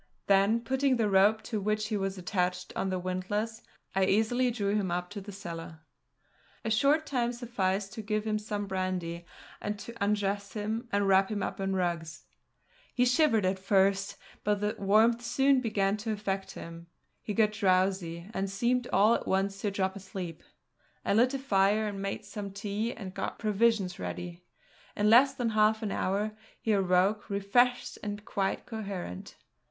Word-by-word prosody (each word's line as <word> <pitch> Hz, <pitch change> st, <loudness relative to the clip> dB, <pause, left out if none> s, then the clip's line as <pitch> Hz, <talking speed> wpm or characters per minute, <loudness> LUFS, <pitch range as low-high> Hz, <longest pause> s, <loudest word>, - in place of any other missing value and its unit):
Then, 200 Hz, +4 st, +4 dB
putting 265 Hz, +2 st, +1 dB
the 225 Hz, -2 st, +2 dB
rope 205 Hz, +3 st, +4 dB
to 215 Hz, -4 st, -3 dB
which 215 Hz, +1 st, -1 dB
he 215 Hz, -, -1 dB
was 195 Hz, -1 st, -2 dB
attached 180 Hz, 0 st, -2 dB
on 190 Hz, -, -1 dB
the 185 Hz, -, -1 dB
windlass, 200 Hz, +5 st, -3 dB, 0.3 s
I 190 Hz, 0 st, +3 dB
easily 225 Hz, +6 st, +2 dB
drew 205 Hz, -4 st, -1 dB
him 200 Hz, -3 st, 0 dB
up 180 Hz, +1 st, -2 dB
to 205 Hz, -1 st, -6 dB
the 205 Hz, +2 st, -9 dB
cellar. 165 Hz, -4 st, -8 dB, 0.8 s
A 220 Hz, -, 0 dB
short 285 Hz, +8 st, +3 dB
time 245 Hz, -5 st, 0 dB
sufficed 200 Hz, -5 st, -2 dB
to 220 Hz, -, -5 dB
give 215 Hz, 0 st, -2 dB
him 215 Hz, -1 st, 0 dB
some 210 Hz, -1 st, -3 dB
brandy, 185 Hz, -3 st, -3 dB, 0.3 s
and 210 Hz, 0 st, -3 dB
to 235 Hz, -, -8 dB
undress 200 Hz, -1 st, 0 dB
him 220 Hz, +3 st, -3 dB
and 200 Hz, 0 st, +2 dB
wrap 195 Hz, 0 st, +4 dB
him 210 Hz, -2 st, -2 dB
in 195 Hz, 0 st, -2 dB
rugs. 170 Hz, -4 st, -2 dB, 0.7 s
He 250 Hz, -, +4 dB
shivered 250 Hz, -, +3 dB
at 190 Hz, +1 st, 0 dB
first, 195 Hz, +1 st, +2 dB, 0.3 s
but 205 Hz, 0 st, +1 dB
the 210 Hz, +1 st, -1 dB
warmth 220 Hz, +4 st, +4 dB
soon 270 Hz, +2 st, +3 dB
began 205 Hz, -3 st, +1 dB
to 220 Hz, +1 st, -3 dB
affect 195 Hz, -2 st, -3 dB
him. 170 Hz, 0 st, -9 dB, 0.3 s
He 210 Hz, -, -4 dB
got 215 Hz, -2 st, +4 dB
drowsy, 185 Hz, -4 st, +1 dB
and 195 Hz, 0 st, -1 dB
seemed 240 Hz, +5 st, 0 dB
all 205 Hz, +4 st, +5 dB
at -, -, -2 dB
once 195 Hz, +1 st, 0 dB
to 210 Hz, -, 0 dB
drop 190 Hz, -1 st, -1 dB
asleep. 185 Hz, -4 st, -7 dB, 0.6 s
I -, -, +2 dB
lit 245 Hz, +5 st, +4 dB
a -, -, 0 dB
fire 210 Hz, -4 st, +2 dB
and 200 Hz, -1 st, -6 dB
made 195 Hz, +2 st, -4 dB
some 205 Hz, 0 st, -6 dB
tea 205 Hz, +3 st, -3 dB
and 195 Hz, -6 st, -8 dB
got -, -, -4 dB
provisions 210 Hz, -3 st, +1 dB
ready. 175 Hz, 0 st, -5 dB, 0.5 s
In 210 Hz, +1 st, +3 dB
less 265 Hz, +4 st, +6 dB
than 245 Hz, -3 st, 0 dB
half 215 Hz, +1 st, +3 dB
an 210 Hz, -, -2 dB
hour 200 Hz, +4 st, 0 dB, 0.3 s
he 220 Hz, -, -1 dB
awoke, 195 Hz, +1 st, +2 dB
refreshed 225 Hz, +5 st, +1 dB
and 205 Hz, 0 st, -5 dB
quite 195 Hz, -1 st, -1 dB
coherent. 195 Hz, -, -6 dB
205 Hz, 170 wpm, -30 LUFS, 190-220 Hz, 0.8 s, less